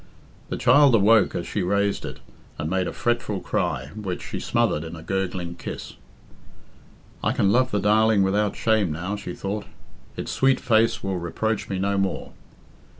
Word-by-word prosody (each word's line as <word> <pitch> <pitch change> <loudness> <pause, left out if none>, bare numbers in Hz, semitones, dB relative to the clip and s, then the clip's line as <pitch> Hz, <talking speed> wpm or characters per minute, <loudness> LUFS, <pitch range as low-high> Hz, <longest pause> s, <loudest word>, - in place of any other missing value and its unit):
The - - -3
child 140 0 +6
awoke 110 +1 +4
as 85 - -2
she 105 - -2
raised 100 +2 0
it, - - -8 0.4
and 75 +2 -3
made 95 -1 +1
a - - -3
fretful 120 -4 -1
cry, 65 -4 -2
which 95 -4 -4
she - - -5
smothered 75 - 0
in 80 +1 -7
a 80 - -10
gurgling 90 -2 -2
kiss. - - -7 1.3
"I - - +2
can 100 - +2
love 130 +3 +3
the 105 - 0
darling 110 0 +4
without 100 +2 +1
shame 110 -6 +1
now," 90 +6 -3
she 90 -3 -6
thought. 100 +2 -4 0.5
"It's - - -4
sweet 135 0 +3
face 115 -1 +2
will 95 -2 -2
reproach 105 +4 -2
me 95 - -2
no 100 +1 0
more." 95 -1 -2
100 Hz, 170 wpm, -24 LUFS, 95-110 Hz, 1.3 s, child